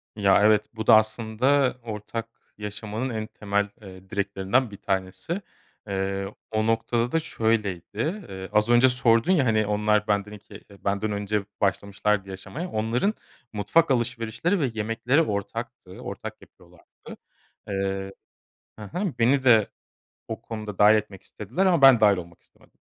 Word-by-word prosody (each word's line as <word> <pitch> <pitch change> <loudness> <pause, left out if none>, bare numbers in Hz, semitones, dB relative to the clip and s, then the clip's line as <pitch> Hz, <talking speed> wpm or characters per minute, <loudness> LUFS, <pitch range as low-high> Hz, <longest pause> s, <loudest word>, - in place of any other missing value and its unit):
Ya, 100 -1 +4
evet, 105 0 +4
bu 110 0 -6
da 115 - +9
aslında 115 +5 +2
ortak 115 +1 -5 0.3
yaşamanın 105 +4 -4
en 110 -2 -4
temel, 105 -2 -1
eee, 95 -1 -13
direklerinden 100 +3 0
bir 100 - -9
tanesi. 95 - -3 0.5
Eee, 95 0 -2 0.2
o 110 0 0
noktada 115 +1 0
da 165 - +2
şöyleydi. 110 - -2
Eee, 95 0 -7
az 105 +1 +2
önce 120 +2 +6
sordun 120 +5 +3
ya, 150 -8 +3
hani, 110 -2 +2
onlar 105 0 +1
benden 105 0 0
2 105 0 -12 0.2
benden 100 +2 0
önce 100 0 -2 0.2
başlamışlardı 100 +1 0
yaşamaya. 100 - -6
Onların 115 - 0 0.4
mutfak 125 +10 +2
alışverişleri 120 - 0
ve 130 -5 0
yemekleri 115 +7 +1
ortaktı. 110 - -4
Ortak - - -7
yapıyorlardı. - - -20 0.8
Eee 95 0 -2 0.7
He - - -9
he, 175 - -3
beni 130 +3 +3
de 110 -5 +5 0.6
o - - -5
konuda 105 -3 -7
dâhil 105 +1 +7
etmek 105 -3 -3
istediler 120 - -3
ama 175 -6 +3
ben 135 -4 +8
dâhil 105 -3 +5
olmak 85 -1 -9
istemedim. - - -27
110 Hz, 140 wpm, -25 LUFS, 100-120 Hz, 0.8 s, da